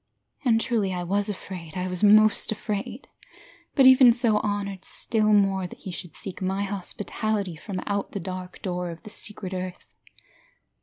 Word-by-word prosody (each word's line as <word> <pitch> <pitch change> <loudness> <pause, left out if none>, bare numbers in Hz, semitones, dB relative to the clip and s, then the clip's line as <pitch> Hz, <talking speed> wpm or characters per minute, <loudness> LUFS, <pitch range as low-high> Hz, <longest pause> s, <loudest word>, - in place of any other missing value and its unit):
And 230 -4 +3
truly 215 -6 0
I 180 - -3
was 200 +4 0
afraid, 185 -5 -7
I 180 0 -2
was 180 0 -3
most 215 +1 +5
afraid, 215 +3 -4 0.7
But 270 - +6
even 260 -1 +8
so, 230 -3 +3
honoured 200 -2 -3
still 215 -2 +1
more 195 -2 +3
That - - -12
he 190 - -8
should 175 -1 -8
seek 195 -2 -7
my 190 +2 -1
hospitality 200 0 -3
From 185 +3 -6
out 200 -1 -2
the 200 - -3
dark 185 0 -7
door 180 -2 -2
of 165 -1 -9
the 215 - -7
secret 205 -4 -3
earth. 185 -1 -6
200 Hz, 165 wpm, -25 LUFS, 185-215 Hz, 0.7 s, even